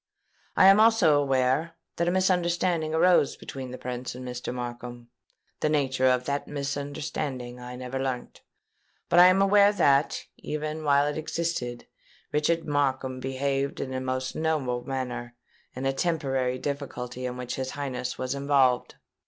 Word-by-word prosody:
I - - +7
am 195 +2 +8
also 215 -10 +5
aware 135 +4 +1 0.2
that 170 - 0
a - - +3
misunderstanding 175 -3 +1
arose 170 -3 +4
between 130 -2 -7
the 125 - -7
Prince 125 0 -5
and 125 0 -7
Mr. 125 0 -5
Markham: 120 -1 -7 0.5
the 155 - +1
nature 135 -3 +1
of 125 -1 +2
that 140 0 -2
misunderstanding 140 -3 -4
I 125 0 -8
never 125 +1 -5
learnt; 130 -2 -4 0.7
but 175 - +5
I 180 - +10
am 190 +2 +4
aware 200 +1 +6
that, 140 -8 +2
even 155 +1 -4
while 140 -1 +4
it 150 +1 -2
existed, 155 -7 -3 0.5
Richard 165 +3 +1
Markham 135 -3 0
behaved 135 +1 -2
in 130 - -4
the 130 0 -3
most 130 0 -3
noble 140 -6 -1
manner 125 -2 -4 0.4
in 130 +1 -4
a 135 - +1
temporary 135 -5 0
difficulty 130 -3 -4
in 125 0 -5
which 125 -1 -5
his 130 0 -3
Highness 130 -3 -4
was 130 +1 -2
involved. 140 -3 +2
135 Hz, 150 wpm, -27 LUFS, 125-155 Hz, 0.7 s, I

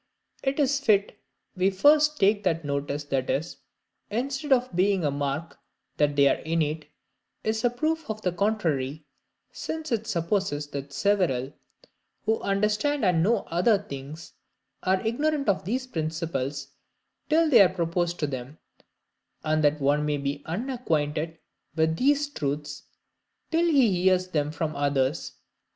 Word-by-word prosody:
It 270 +2 -1
is 280 -1 +2
fit 205 - +2 0.4
we 185 +1 +3
first 295 +9 +4
take 205 +1 +3 0.2
notice 140 0 -2
that 135 -3 -2
this, 160 +5 -2 0.5
instead 270 +6 -3
of 250 -6 +2
being 190 -1 +2
a 145 - +1
mark 145 +3 -3 0.4
that 145 -1 +2
they 140 -1 +5
are - - +2
innate, 155 -2 -1 0.6
is 220 0 -1
a 245 - +4
proof 310 +5 -2
of 215 0 -3
the 180 - +1
contrary; 160 -8 -1 0.5
since 320 -2 -5
it 225 -1 -1
supposes 170 -5 -1
that 140 0 -6
several, 140 -5 +1 0.7
who 220 +1 +1
understand 210 +7 +1
and 180 -3 +3
know 210 +4 +2
other 190 +6 +4
things, 150 -4 -9 0.5
are 190 +2 +1
ignorant 290 +5 0
of 195 -5 +1
these 255 +6 -1
principles 155 - -3 0.6
till 325 +1 +4
they 245 - +8
are 190 - +7
proposed 175 -1 -1
to - - +2
them; 135 +1 -6 0.9
and 155 0 +1
that 150 +1 +3
one 145 +2 +2
may 150 -1 0
be 140 0 -3
unacquainted 165 - -2 0.4
with 160 0 +1
these 290 - +2
truths 145 - -4 0.7
till 335 +1 +3
he 240 - +3
hears 185 0 +3
them 150 -3 0
from 155 0 -3
others. 140 +1 0
175 Hz, 140 wpm, -26 LUFS, 145-225 Hz, 0.9 s, they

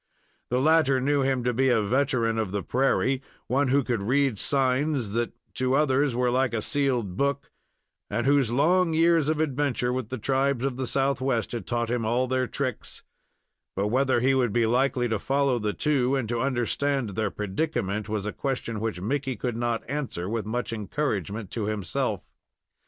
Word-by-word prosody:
The 125 - +1
latter 150 -2 +4
knew 140 +2 +1
him 130 -2 0
to 125 0 +1
be 130 +3 +2
a 120 -3 +4
veteran 115 0 +1
of 110 -3 -1
the 100 0 -3
prairie, 135 0 +1 0.2
one 140 +2 +1
who 140 +2 +3
could 120 -4 -1
read 130 +1 +1
signs 135 -3 +1
that 120 +2 -1 0.3
to 130 +1 +1
others 140 -2 +2
were 125 0 +1
like 125 -1 +1
a 110 - -1
sealed 125 -10 0
book, 140 0 -1 0.6
and 120 +4 -1
whose 140 -3 +3
long 165 +6 +3
years 165 -2 +3
of 155 -1 0
adventure 140 -4 0
with 130 -3 -3
the 130 - -4
tribes 135 +2 0
of 135 -2 -1
the 130 -1 -2
Southwest 135 -4 0
had 120 - -5
taught 120 -1 -1
him 120 -1 0
all 120 +3 +1
their 130 0 0
tricks; 130 0 -4 0.7
but 100 +2 0
whether 130 0 +2
he 135 +2 +3
would 125 -4 +2
be 115 +1 +2
likely 125 +1 +1
to 110 -3 -1
follow 135 +1 +1
the 105 -1 -1
two, 135 0 +1
and 130 -4 -1
to 120 -1 -1
understand 135 0 0
their 110 +3 -1
predicament, 105 -1 -2
was 105 -2 -2
a 105 - -3
question 125 -5 -3
which 110 -4 -3
Mickey 130 +6 -2
could 120 +2 -3
not 120 -1 -2
answer 130 -10 -3
with 110 -1 -3
much 120 +1 -2
encouragement 105 - -3
to 110 -3 -2
himself. 105 -5 -3
125 Hz, 185 wpm, -26 LUFS, 115-140 Hz, 0.7 s, latter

